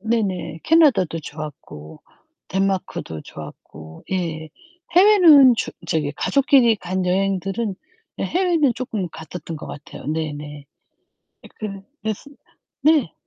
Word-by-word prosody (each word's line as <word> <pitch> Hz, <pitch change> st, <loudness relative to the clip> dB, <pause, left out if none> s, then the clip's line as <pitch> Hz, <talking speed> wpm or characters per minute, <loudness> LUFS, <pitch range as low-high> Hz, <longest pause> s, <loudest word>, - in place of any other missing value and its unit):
네네. 200 Hz, -7 st, -2 dB
캐나다도 230 Hz, -, +4 dB
좋았고 145 Hz, -, -9 dB, 0.5 s
덴마크도 190 Hz, -, -2 dB
좋았고 80 Hz, +1 st, -12 dB
예. 160 Hz, -4 st, -3 dB, 0.5 s
해외는 335 Hz, -, +8 dB
주 -, -, -2 dB, 0.2 s
저기 155 Hz, -4 st, -1 dB
가족끼리 265 Hz, -5 st, +4 dB
간 185 Hz, -1 st, -3 dB
여행들은 195 Hz, +3 st, -1 dB, 0.5 s
예 -, -, 0 dB
해외는 340 Hz, -7 st, +2 dB
쪼끔 220 Hz, -6 st, -4 dB
갔었던 160 Hz, +1 st, -8 dB
것 -, -, -9 dB
같아요. 145 Hz, -, -10 dB
네네. 150 Hz, -2 st, -4 dB, 0.8 s
예 -, -, -12 dB
그르 200 Hz, -3 st, -5 dB, 0.2 s
그랬습니다. 220 Hz, +6 st, -6 dB, 0.4 s
네. 290 Hz, -, +3 dB
190 Hz, 255 characters per minute, -21 LUFS, 160-250 Hz, 0.8 s, 해외는